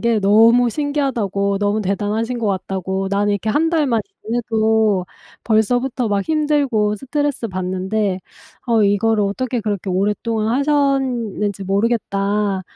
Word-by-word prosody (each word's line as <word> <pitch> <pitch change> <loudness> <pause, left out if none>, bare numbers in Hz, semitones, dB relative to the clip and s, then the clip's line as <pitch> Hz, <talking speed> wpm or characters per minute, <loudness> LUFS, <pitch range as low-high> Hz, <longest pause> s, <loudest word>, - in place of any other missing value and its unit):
게 235 -2 +1
너무 230 +4 +5
신기하다."고 230 -9 -1
"너무 205 +1 0
대단하신 210 +5 -2
것 225 - -2
같다."고. 190 0 -2
"나는 205 +1 +1
이렇게 205 +2 -2
1 315 +8 +2
달만 290 -9 +1 0.2
지내도 220 -4 +1 0.4
벌써부터 245 +3 +1
막 200 -1 0
힘들고 285 -9 +1
스트레스받는데 205 -7 -2 0.5
어 225 -3 +4
이거를 205 +1 +2
어떻게 245 +5 -2
그렇게 205 -3 -3
오랫동안 210 +3 -1
하셨는지 260 -9 0
모르겠다. 200 -1 0
215 Hz, 305 characters per minute, -19 LUFS, 200-245 Hz, 0.5 s, 너무